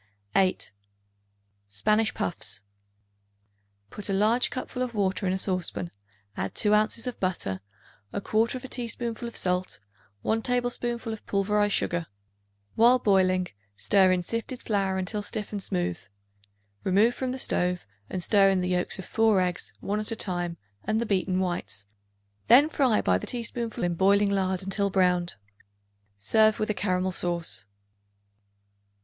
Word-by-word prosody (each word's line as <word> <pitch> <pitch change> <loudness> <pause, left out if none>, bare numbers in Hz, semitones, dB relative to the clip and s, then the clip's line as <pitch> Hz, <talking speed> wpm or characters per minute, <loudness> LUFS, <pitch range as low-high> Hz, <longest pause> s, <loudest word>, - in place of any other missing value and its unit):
8. 185 -1 +2 1.0
Spanish 215 - +1
Puffs. 170 - 0 1.3
Put 210 -1 -5
a - - +1
large 215 +5 +3
cupful 255 0 -5
of 245 -2 -2
water 195 -1 0
in - - +1
a - - 0
saucepan; 185 -2 -1 0.4
add 95 - -4
2 210 - +3
ounces 215 +2 +2
of 250 - -5
butter, 170 - -2 0.5
1/4 230 +5 -1
teaspoonful 235 -1 -3
of 235 - -5
salt, 180 0 0 0.4
1 225 +1 +1
tablespoonful 240 -1 -1
of 220 - -9
pulverized 205 +1 +1
sugar. 170 -1 -1 0.7
While 240 +3 +6
boiling, 185 -5 +2 0.3
stir 190 - +4
in 180 -1 +1
sifted 230 +5 -4
flour 195 -3 0
until 195 +3 -2
stiff 210 0 -5
and 205 -2 -3
smooth. 90 - -2 0.8
Remove 205 +6 +3
from 255 0 -3
the 260 - -4
stove 180 -7 0 0.2
and 180 - -3
stir 200 -1 +5
in 190 -1 +2
the 180 - -1
yolks 180 -1 0
of 190 - -7
4 220 -3 +3
eggs, 180 -1 -1
one 205 +1 -1
at 215 - -2
a - - -1
time, 175 -4 -1 0.3
and 215 +1 0
the 235 - -1
beaten 185 -3 0
whites; 175 - -3 0.6
then 280 +6 +7
fry 260 -8 +2
by 90 0 +2
the - - -7
teaspoonful 235 -2 -3
in 175 -1 +1
boiling 200 +3 +3
lard 190 -1 0
until 200 +1 0
browned. 180 -2 +2 0.8
Serve 215 - +4
with 215 0 0
a - - 0
caramel 185 -1 0
sauce. 170 - -2
200 Hz, 145 wpm, -27 LUFS, 180-225 Hz, 1.3 s, then